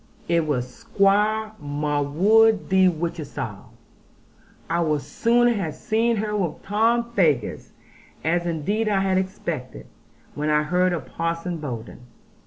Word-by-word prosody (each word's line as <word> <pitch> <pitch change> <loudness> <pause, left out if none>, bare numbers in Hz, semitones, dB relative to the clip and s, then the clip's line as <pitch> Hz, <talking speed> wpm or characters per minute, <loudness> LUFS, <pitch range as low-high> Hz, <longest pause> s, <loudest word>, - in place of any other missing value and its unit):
It 170 -2 +1
was 125 -4 -1
Squire 215 0 +2
Marwood 150 +10 +2
de 190 0 +5
Whichehalse. 165 -2 -5 1.0
I 170 +1 0
would 155 -4 0
sooner 240 +1 +2
have 170 -8 -3
seen 230 +2 +1
her 210 0 -2
with 185 -6 -2
Tom 230 +3 +1
Faggus, 150 - 0 0.5
as 170 +2 0
indeed 200 +7 -1
I 195 -2 +2
had 190 -1 +2
expected, 170 -8 -5 0.5
when 150 +1 -2
I 150 0 +3
heard 180 +3 +1
of 165 -7 -3
Parson 165 +4 -3
Bowden. 120 -8 -7
175 Hz, 125 wpm, -23 LUFS, 150-210 Hz, 1.0 s, de